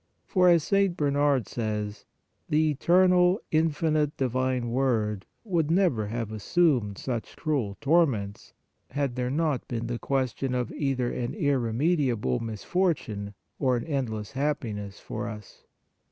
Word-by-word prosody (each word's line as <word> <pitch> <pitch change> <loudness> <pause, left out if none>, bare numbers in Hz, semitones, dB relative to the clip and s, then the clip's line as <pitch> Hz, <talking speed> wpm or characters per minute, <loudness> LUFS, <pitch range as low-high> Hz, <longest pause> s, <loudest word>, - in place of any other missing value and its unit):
For, 180 -2 +4
as 170 -3 +5
St. 195 -1 +2
Bernard 145 -3 +2
says, 105 -2 -3 0.4
the 155 0 +3
eternal, 180 +5 +4
in 160 +1 +3
finite 155 -1 0
Divine 130 -2 0
Word 110 -6 0 0.2
would 170 -8 0
never 165 - +2
have 115 0 -3
assumed 110 - +1
such 120 -4 -4
cruel 135 -11 -1
torments, 135 -10 +1 0.4
had 140 -4 -2
there 125 -1 -1
not 150 -1 0
been 120 0 -3
question 135 -1 -1
of 125 -2 -1
either 135 -4 -1
an 120 0 -3
irremediable 130 - +1
misfortune 110 - -2 0.2
or 130 -3 +2
an 120 - -3
endless 120 -9 -3
hap 145 +2 0
piness 105 -4 -6
for - - -5
us. 105 -3 -10
130 Hz, 130 wpm, -27 LUFS, 115-155 Hz, 0.4 s, as